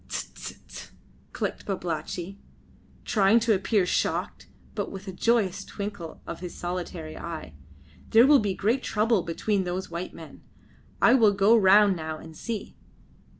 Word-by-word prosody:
"Tse! - - -5
tse! - - -8
tse!" - - -10 0.4
clicked - - -4
Babalatchi, 180 0 -4 0.7
trying 215 0 +4
to 225 0 +3
appear 200 0 +1
shocked, - - -1 0.3
but - - -3
with 195 +1 -9
a - - -3
joyous 205 -1 +1
twinkle 200 -5 -7
of 170 - -6
his 180 -1 -7
solitary 175 -2 -5
eye. 165 - -7 0.6
"There 230 +2 +7
will 285 0 +7
be 200 -3 -1
great 230 +8 +1
trouble 215 -2 +1
between 190 +4 -1
those 180 0 -4
white 170 +2 -5
men. - - -12 0.6
I 235 - +7
will 220 -6 +5
go 200 +3 +5
round 200 -1 +6
now 160 -1 -5
and 160 0 -12
see. 225 +5 -5
195 Hz, 150 wpm, -26 LUFS, 175-215 Hz, 0.7 s, There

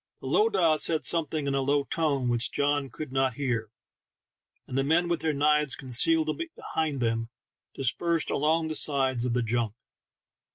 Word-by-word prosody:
The - - -12
lowdah 170 0 +2
said 160 0 +1
something 155 -3 0
in 140 - -1
a 135 - +1
low 140 +1 +1
tone 140 -4 -1
which 120 0 0
John 145 -1 0
could 145 +3 -8
not 135 -2 0
hear, 120 -6 -2 1.0
and - - -7
the 135 - +2
men 165 +5 +2
with 170 -1 -1
their 160 - 0
knives 150 0 +2
concealed 310 - +2 0.2
behind 155 -4 -3
them, 115 -1 -1 0.5
dispersed 165 +5 -1
along 160 +3 +1
the 155 - -3
sides 135 -5 +2
of 120 - -1
the 125 0 0
junk. 115 -1 -1
140 Hz, 165 wpm, -27 LUFS, 125-160 Hz, 1.0 s, lowdah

